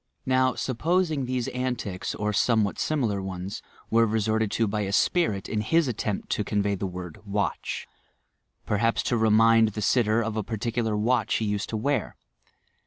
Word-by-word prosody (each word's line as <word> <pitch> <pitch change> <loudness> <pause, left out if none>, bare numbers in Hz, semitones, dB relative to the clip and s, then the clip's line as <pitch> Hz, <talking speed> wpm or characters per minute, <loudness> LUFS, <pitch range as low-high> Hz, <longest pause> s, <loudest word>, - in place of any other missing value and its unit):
"Now, 130 0 +2
supposing 155 +2 0
these 125 -1 -2
antics, 125 -7 -3
or 105 0 -1
somevbat 110 -1 +2
similar 115 -10 0
ones, 95 0 -5 0.3
were 115 0 +4
resorted 110 0 +1
to 115 - +2
by 105 +1 -1
a 100 -1 -2
spirit 105 - +1
in 105 - -1
his 165 +8 +2
attempt 110 -4 -3
to 105 - 0
otrnvcy 100 -2 -1
the 95 - -1
word 90 -2 -7
'watch* 100 0 -2 0.4
— - - -49
perhaps 115 +3 +2
to 120 - 0
remind 110 0 +5
the 105 - -4
stter 115 0 +2
of 110 -1 -3
a 110 - 0
partiealar 110 0 -2
watch 115 +1 +1
be 110 - -1
used 105 -1 -2
to 110 - -2
wear. 135 +1 -1
110 Hz, 170 wpm, -26 LUFS, 105-125 Hz, 0.4 s, remind